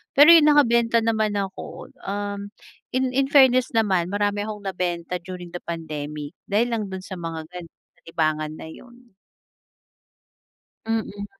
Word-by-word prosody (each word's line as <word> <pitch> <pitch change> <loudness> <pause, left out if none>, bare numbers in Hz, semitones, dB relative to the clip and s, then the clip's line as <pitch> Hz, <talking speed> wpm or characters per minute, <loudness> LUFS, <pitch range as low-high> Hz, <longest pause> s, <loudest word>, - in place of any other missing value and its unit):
Pero 290 +3 +8
yun 320 -3 +6
nakabenta 235 -6 +4
naman 220 -2 +1
ako, 190 -1 -9 0.5
um, 205 0 -3 0.6
in 260 - +2 0.2
in 270 - +2
fairness 255 -2 +6
naman 195 -6 +2
marami 205 0 0
akong 210 -1 -7
nabenta 180 -2 -2
during 180 -1 -7
the 175 - -5
pandemic 150 -2 -5 0.2
dahil 220 +4 +3
lang 220 - -1
dun 190 0 -6
sa - - -3
mga 165 -1 -5
ganun, 180 -2 -10 0.4
libangan 155 -2 -1
na - - -8
yun. 240 +5 -15 1.7
Mm. 215 -2 -2
200 Hz, 135 wpm, -23 LUFS, 170-230 Hz, 1.7 s, Pero